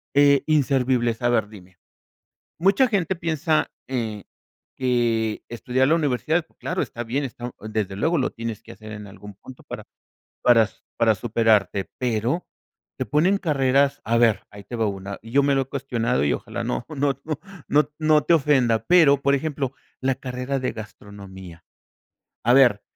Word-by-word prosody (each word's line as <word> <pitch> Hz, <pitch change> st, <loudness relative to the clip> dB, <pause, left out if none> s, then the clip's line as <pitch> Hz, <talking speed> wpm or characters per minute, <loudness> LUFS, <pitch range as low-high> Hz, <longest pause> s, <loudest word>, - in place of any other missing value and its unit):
eh, 140 Hz, -1 st, +5 dB
inservibles 130 Hz, -5 st, +1 dB
A 120 Hz, -, +2 dB
ver, 110 Hz, -4 st, +1 dB
dime. 95 Hz, -4 st, -15 dB, 0.8 s
Mucha 200 Hz, +8 st, +4 dB
gente 190 Hz, -4 st, 0 dB
piensa, 160 Hz, -2 st, 0 dB, 0.2 s
eh, 110 Hz, -6 st, -3 dB, 0.5 s
que 120 Hz, -4 st, 0 dB
estudiar 125 Hz, +3 st, 0 dB
la 165 Hz, -, +5 dB
universidad, 155 Hz, +2 st, 0 dB
claro, 185 Hz, +2 st, -2 dB
está 120 Hz, -3 st, -4 dB
bien, 135 Hz, +5 st, -2 dB
está 120 Hz, -1 st, -7 dB
desde 105 Hz, -3 st, -3 dB
luego 160 Hz, +8 st, +1 dB
lo 130 Hz, -, +1 dB
tienes 115 Hz, -2 st, -6 dB
que -, -, -12 dB
hacer 110 Hz, 0 st, -11 dB
en 105 Hz, -1 st, -8 dB
algún 100 Hz, +1 st, -12 dB
punto 125 Hz, +5 st, -14 dB
para -, -, -8 dB, 0.6 s
para 120 Hz, -2 st, +6 dB
s 110 Hz, -, -10 dB, 0.2 s
para 115 Hz, -2 st, +3 dB
superarte, 105 Hz, -3 st, +1 dB
pero 125 Hz, +6 st, -1 dB, 0.5 s
te -, -, -1 dB
ponen 175 Hz, +7 st, +3 dB
carreras 140 Hz, -5 st, +2 dB
a 115 Hz, +1 st, +1 dB
ver, 115 Hz, -3 st, +3 dB
ahí 100 Hz, -1 st, -12 dB
te 120 Hz, -, -9 dB
va 115 Hz, -1 st, +1 dB
una, 100 Hz, 0 st, -5 dB
y 115 Hz, +1 st, -12 dB
yo 140 Hz, +1 st, +4 dB
me 140 Hz, 0 st, +2 dB
lo 135 Hz, -, +2 dB
he -, -, -4 dB
cuestionado 125 Hz, -, -1 dB
y 70 Hz, -, +2 dB
ojalá -, -, -4 dB
no 120 Hz, -, -2 dB
no 145 Hz, -2 st, 0 dB
no 155 Hz, -2 st, -3 dB, 0.3 s
no 150 Hz, 0 st, +3 dB
no 155 Hz, -1 st, +4 dB
te -, -, +3 dB
ofenda, 130 Hz, -7 st, +2 dB
pero 155 Hz, -6 st, +5 dB
por 140 Hz, 0 st, +3 dB
ejemplo, 140 Hz, -2 st, -2 dB, 0.3 s
la 130 Hz, 0 st, +1 dB
carrera 130 Hz, +1 st, -3 dB
de 130 Hz, -, -2 dB
gastronomía. 100 Hz, -5 st, -11 dB, 0.8 s
A 120 Hz, +2 st, +4 dB
ver, 120 Hz, -7 st, +5 dB
125 Hz, 170 wpm, -23 LUFS, 110-140 Hz, 0.8 s, para